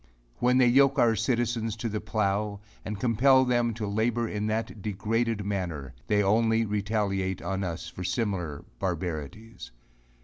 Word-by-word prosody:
When 125 +1 +3
they 130 - +6
yoke 135 +3 +5
our 115 -2 +4
citizens 115 -1 0
to 115 +1 -4
the 105 -1 -3
plow, 105 -1 -1 0.2
and 105 -1 -5
compel 130 +3 +4
them 120 -1 +2
to 110 -2 -3
labour 115 +3 0
in 105 0 -2
that 110 -1 -3
degraded 110 +2 -1
manner, 85 -10 -3
they 105 -1 +3
only 110 +3 +3
retaliate 100 -3 -1
on 95 +2 -2
us 85 -2 -4
for 90 - -7
similar 90 -6 -2
barbarities. 90 - -4
105 Hz, 145 wpm, -27 LUFS, 95-115 Hz, 0.2 s, they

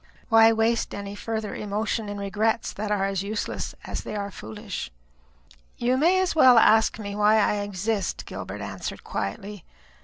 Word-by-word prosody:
Why 225 0 +7
waste 225 +1 +1
any 200 0 -6
further 220 0 -4
emotion 210 +1 -2
in 205 - -5
regrets 210 +3 -1
that 210 +1 -4
are 205 -2 +1
as 195 -1 -1
useless 210 +2 -4
as - - -4
they - - -6
are 200 -1 -3
foolish?" 110 - -7 0.9
"You 245 +1 +1
may 340 +7 +4
as 375 -1 +1
well 255 -6 +7
ask 220 0 +5
me 200 -2 -6
why 210 +1 +4
I 205 -1 +2
exist," 205 0 -2
Gilbert 95 +2 -7
answered 95 -2 -6
quietly. 195 - -5
210 Hz, 160 wpm, -25 LUFS, 200-225 Hz, 0.9 s, Why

